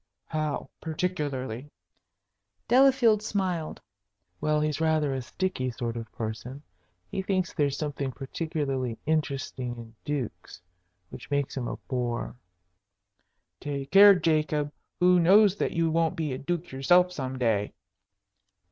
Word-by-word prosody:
"How 155 -2 -2
particularly?" 150 -7 -3 1.0
Delafield 250 -4 +5
smiled. 185 -7 -2 0.6
"Well, 155 0 +1
he's 155 +1 -1
rather 155 -3 +2
a 130 - -2
sticky 130 -1 -2
sort 120 -1 -4
of 115 -1 -6
person. 120 +5 -6 0.5
He 195 - -2
thinks 185 -2 -1
there's 140 -2 0
something 145 -3 -3
particularly 135 -3 -3
interesting 135 -5 -2
in 115 -1 -10
dukes, 125 -13 -4 0.5
which - - -10
makes 140 -1 -1
him 125 -3 -3
a - - -4
bore." 120 -2 -3 1.2
"Take 140 -2 -5
care, 200 +1 +9
Jacob! 155 -3 +1 0.3
Who 180 0 +5
knows 195 +3 +6
that - - 0
you 165 -1 +1
won't 165 0 +1
be 155 -4 -2
a 130 - -4
duke 175 +3 -3
yourself 175 +7 +4
some 130 -6 -4
day?" 110 -5 +1
150 Hz, 125 wpm, -27 LUFS, 130-175 Hz, 1.2 s, care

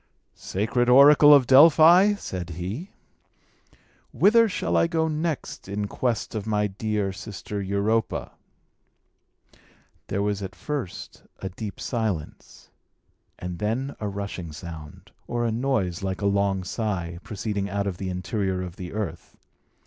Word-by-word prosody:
"Sacred 120 +5 -1
oracle 145 +3 +8
of 140 -3 +7
Delphi," 165 - +7
said 90 - -6
he, 95 - -5 1.2
"whither 230 +2 +4
shall - - -2
I - - +4
go 160 -1 0
next 155 - -3
in 100 +1 -3
quest 120 0 -2
of 110 -1 -4
my 105 -1 +1
dear 105 -1 -2
sister 100 +2 -6
Europa?" 100 +3 -1 1.8
There 100 - -1
was 105 -1 -1
at 95 -1 -6
first 145 -11 -6 0.2
a 95 - -5
deep 100 +3 -7
silence, 110 - -4 0.7
and 90 -1 -6
then 120 +7 -2
a 105 - -3
rushing 100 -4 -5
sound, 75 -1 -10 0.2
or 120 0 -1
a 115 - 0
noise 110 -8 -1
like 95 0 -3
a - - -1
long 100 -1 +1
sigh, 90 -5 -3
proceeding 100 -1 -4
out 100 +1 -2
of 95 -3 -3
the 95 0 -4
interior 95 +1 -2
of 90 -1 -8
the 90 0 -7
earth. 95 -6 -5
105 Hz, 135 wpm, -25 LUFS, 95-125 Hz, 1.8 s, oracle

